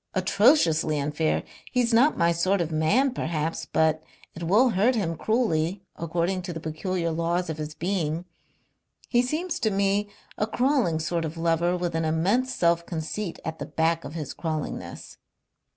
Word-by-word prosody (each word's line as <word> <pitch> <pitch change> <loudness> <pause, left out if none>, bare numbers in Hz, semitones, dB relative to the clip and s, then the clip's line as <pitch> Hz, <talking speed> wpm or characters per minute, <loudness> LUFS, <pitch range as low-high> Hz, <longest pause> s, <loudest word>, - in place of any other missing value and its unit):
Atrociously 185 - +3
unfair. 150 +2 0 0.3
He's 245 -2 +1
not 265 +7 +4
my 170 0 +3
sort 185 +4 +1
of 170 -2 -1
man, 200 - +2
perhaps, 160 -5 -2
but 160 0 +2 0.3
it 165 - -9
will 210 +10 +4
hurt 220 +5 +2
him 170 -7 -1
cruelly 190 -5 0
according 170 +3 -1
to 175 -1 -5
the 165 - -5
peculiar 170 +2 -2
laws 170 +1 -1
of 155 - -7
his 155 0 -5
being. 170 -2 -2 0.8
He 240 - +4
seems 315 +7 -2
to 220 - +1
me 200 +1 +1 0.3
a 215 - +1
crawling 245 - +1
sort 165 +1 -1
of 160 +1 -5
lover 170 +2 +1
with 175 -1 -2
an 165 0 0
immense 190 +12 +1
self 170 -5 +2
conceit 170 +3 -4
at 160 0 -4
the - - -5
back 165 +1 0
of 145 - -8
his 150 -4 -5
crawlingness." 155 -3 -5
170 Hz, 165 wpm, -26 LUFS, 160-205 Hz, 0.8 s, not